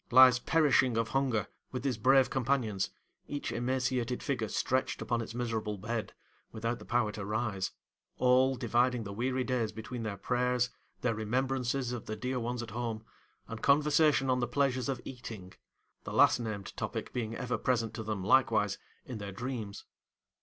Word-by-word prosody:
—lies 130 0 +8
perishing 135 -6 +3
of 115 0 0
hunger 130 -5 +1 0.3
with 125 -1 -4
his 130 -5 -1
brave 135 +2 +5
companions: 125 -7 0 0.4
each 145 0 -3
emaciated 125 0 -1
figure 125 -6 -1
stretched 130 +5 0
upon 120 -2 -1
its 115 0 -7
miserable 110 -3 -2
bed 110 +3 -3 0.4
without 115 +2 -2
the - - -11
power 120 -3 +1
to 105 -1 -6
rise: 105 -2 -1 0.5
all, 130 +1 +4
dividing 120 0 +1
the 100 -1 -6
weary 130 +4 0
days 125 -4 0
between 110 +3 -6
their 105 -3 -3
prayers, 125 +3 +1 0.3
their 125 -2 +1
remembrances 125 +3 -1
of 120 -3 -5
the 110 - -3
dear 125 +4 -2
ones 120 0 -2
at 110 - -8
home, 115 -1 -3 0.4
and 115 -1 -7
conversation 150 0 +4
on 130 -1 +2
the 120 - 0
pleasures 130 0 +1
of 130 -3 -1
eating; 110 -8 -8 0.5
the - - -6
last - - +5
named 110 -4 -5
topic - - -4
being 115 -2 -2
ever 125 +1 -2
present 115 -3 0
to 110 - -5
them, 105 -3 -3
likewise, 105 -3 +3 0.3
in 125 -4 -6
their 100 -1 -5
dreams. 110 -1 -5
120 Hz, 165 wpm, -31 LUFS, 110-130 Hz, 0.5 s, lies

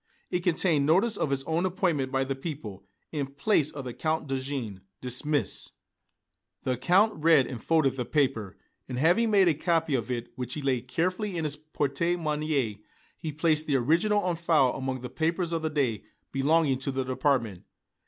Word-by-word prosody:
It 180 - +1
contained 165 -4 +2
notice 200 +8 +3
of 155 - -1
his 135 -1 0
own 165 +4 0
appointment 170 -8 0
by 135 0 +1
the 135 +1 -2
people, 130 - -7 0.2
in 145 -3 -2
place 140 +3 +1
of 140 -2 -7
the 125 - -5
Count 160 +2 -1
Dejean, 130 -7 -4 0.2
dismissed. 130 -1 -1 0.9
The 130 - 0
Count 190 - +3
read 160 -5 +6
and 120 -3 -7
folded 155 -5 +2
the 125 - -2
paper, 130 -10 0 0.3
and 125 - -4
having 175 - +3
made 200 -3 +5
a 170 - +5
copy 165 0 0
of 120 -3 -1
it, 120 -1 -3
which 125 -1 -5
he 150 - -4
laid 130 -2 0
carefully 185 +7 -1
in 165 - -1
his 150 -1 -1
porte 150 -2 -3 0.2
monnaie, 150 -8 -1 0.4
he 160 - -5
placed 155 0 +1
the 145 - +2
original 170 - +2
on 180 -2 0
file 160 -6 +3
among 130 -1 -3
the 125 - -6
papers 165 +1 -1
of 165 - 0
the 160 - -1
day 135 -8 0 0.3
belonging 140 0 +2
to 135 +1 -3
the 130 0 -1
department. 125 - 0
145 Hz, 185 wpm, -28 LUFS, 130-165 Hz, 0.9 s, read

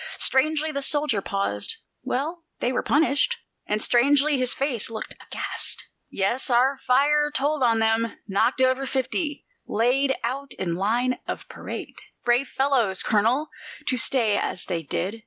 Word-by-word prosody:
Strangely 310 +3 +1
the 280 -1 -3
soldier 280 -6 +1
paused: 195 - -2 0.3
"Well, 320 +7 -3 0.2
they 245 - 0
were 255 - 0
punished." 310 - +2 0.3
And 210 - 0
strangely 280 +4 +4
his 255 -1 +1
face 270 -5 0
looked, 220 -1 -6
aghast. - - -2 0.3
"Yes, 235 +8 -1
our 260 +3 +3
fire 295 +4 +3
told 295 0 0
on 230 -3 +4
them; 225 0 +1
knocked 220 +6 +1
over 260 +1 +2
fifty 280 +4 -2 0.2
laid 265 +5 +2
out 265 +3 -3
in 175 -3 -3
line 235 +8 0
of - - -5
parade. - - -7 0.3
Brave 245 +3 +3
fellows, 250 -10 +1
Colonel, 235 +8 +2 0.4
to 255 - +1
stay 230 -4 +2
as - - -3
they 175 -3 -2
did! 185 +8 -3
255 Hz, 145 wpm, -25 LUFS, 225-280 Hz, 0.4 s, strangely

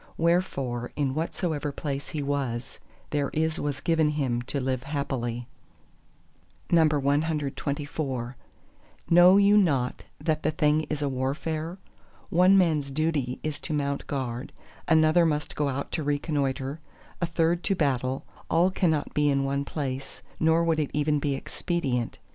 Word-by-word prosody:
Wherefore 140 -8 0
in 140 -3 0
whatsoever 155 -1 -2
place 140 -1 -4
he 150 -2 -3
was, 135 -4 -3 0.3
there 145 -2 0
is 160 +1 0
was 145 -1 -3
given 160 -1 +2
him 135 -5 -1
to 140 - -1
live 130 -1 -1
happily. 130 -4 -3 1.3
CXXV 145 -4 0 0.8
Know 175 +3 +8
you 200 +1 +6
not 135 -10 +1 0.2
that 155 -2 0
the 155 - +1
thing 155 0 +2
is 150 -1 -2
a - - +1
warfare? 155 +6 -2 0.5
one 185 +3 +6
man's 155 -6 +2
duty 140 -3 -1
is 155 -1 -3
to 155 - -3
mount 140 -1 -2
guard, 130 -2 -3 0.4
another 160 +1 +5
must 150 -2 0
go 145 -1 0
out 140 +1 -4
to 160 - -2
reconnoitre, 145 -1 -1 0.4
a - - +3
third 165 +1 +1
to 195 - +2
battle; 130 -5 0 0.2
all 175 +3 +3
cannot 160 -6 0
be 150 0 +3
in 140 -1 +2
one 140 +1 0
place, 135 -2 -5 0.2
nor 160 +1 +3
would 165 -1 +2
it 150 - 0
even 150 0 +2
be 140 -1 0
expedient. 135 -5 -2
145 Hz, 140 wpm, -27 LUFS, 135-160 Hz, 1.3 s, Know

